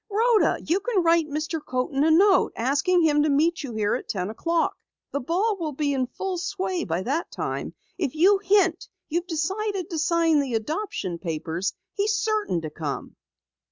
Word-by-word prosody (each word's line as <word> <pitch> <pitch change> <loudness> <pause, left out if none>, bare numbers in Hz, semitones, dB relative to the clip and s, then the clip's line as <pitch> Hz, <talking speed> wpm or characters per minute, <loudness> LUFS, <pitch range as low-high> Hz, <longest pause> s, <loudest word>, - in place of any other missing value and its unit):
Rhoda, 445 +2 +3
you 345 +5 +2
can 400 -4 0
write 335 -1 +3
Mr. 310 +1 -3
Coaten 260 +2 -1
a 320 - +4
note, 375 +4 +5
asking 295 +9 +2
him 295 -2 +4
to 300 - +2
meet 320 +4 +2
you 275 -5 -6
here 210 -1 0
at 255 - -4
ten 190 0 -2
o'clock. 335 +8 0 0.4
The 280 - -1
ball 385 - 0
will 310 -3 -3
be 285 +1 0
in 260 -2 0
full 370 +7 -4
sway 375 -1 -2
by 170 +2 -2
that 290 - -1
time. - - -4 0.2
If 310 -5 -1
you 385 +5 +5
hint 385 -3 +2 0.2
you've 345 +3 -1
decided 380 +3 -2
to 325 - -2
sign 330 -1 +3
the 265 -5 -1
adoption 225 - -3
papers, 165 +2 -3 0.2
he's 420 +1 +1
certain 425 - 0
to 155 -1 -6
come." 150 -3 -5
320 Hz, 180 wpm, -25 LUFS, 265-375 Hz, 0.4 s, note